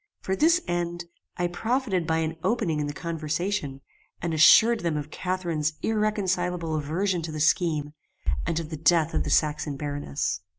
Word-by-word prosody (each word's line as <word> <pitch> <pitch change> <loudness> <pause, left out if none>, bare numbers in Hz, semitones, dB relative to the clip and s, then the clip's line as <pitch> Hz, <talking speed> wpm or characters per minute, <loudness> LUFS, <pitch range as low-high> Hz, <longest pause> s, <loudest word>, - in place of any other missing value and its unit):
For 190 - -1
this 330 - +4
end 175 0 -2 0.3
I 175 - 0
profited 195 0 -1
by 160 - +1
an 160 +1 -4
opening 210 -10 0
in 145 - -1
the - - -3
conversation, 160 -1 -3 0.4
and 170 -1 -2
assured 220 +9 +7
them 170 -5 -1
of 150 0 -5
Catharine's 170 -5 -2
irreconcilable 185 -6 0
aversion 170 +5 -1
to 160 0 -5
the 155 - -5
scheme, 150 -2 +1 0.5
and 165 - 0
of 165 -1 -6
the 155 - -4
death 160 +1 +3
of - - +1
the - - -4
Saxon 150 -2 +1
baroness. 145 - -3
170 Hz, 165 wpm, -26 LUFS, 150-185 Hz, 0.5 s, assured